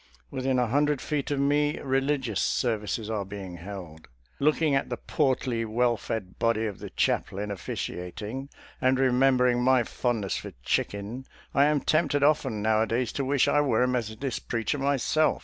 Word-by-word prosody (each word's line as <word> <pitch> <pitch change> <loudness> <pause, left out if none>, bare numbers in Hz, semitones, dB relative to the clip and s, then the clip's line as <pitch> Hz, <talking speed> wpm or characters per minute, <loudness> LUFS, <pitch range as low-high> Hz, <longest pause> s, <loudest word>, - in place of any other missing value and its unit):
Within 130 0 0
a 125 - +3
hundred 145 +4 +2
feet 145 -1 -2
of 145 -1 0
me 145 +2 +2
religious 135 -5 0
services 110 -2 -1
are 110 -2 -2
being 95 -2 -7
held. 85 -4 -9 0.3
Look 150 +2 +3
ing 155 -3 +2
at 135 - +1
the - - -3
portly, 130 -5 0
well 120 +2 +1
fed 100 -3 -5
body 115 -1 +2
of 105 -4 -4
the - - -7
chaplain 105 +2 -1
officiating, 105 +7 -5 0.3
and 130 +1 +3
remembering 125 -1 +3
my 130 -1 +4
fondness 110 -5 -1
for - - -7
chicken, 105 - -2 0.3
I 140 - +5
am 150 -1 +2
tempted 145 -2 +2
often 135 -8 +2
nowadays 110 +2 +1
to 140 - -2
wish 135 0 +2
I 145 - +4
were 125 -4 +2
a - - +3
Methodist 120 +1 -3
preacher 115 +4 -1
myself. 140 +3 +2
125 Hz, 165 wpm, -27 LUFS, 110-140 Hz, 0.3 s, I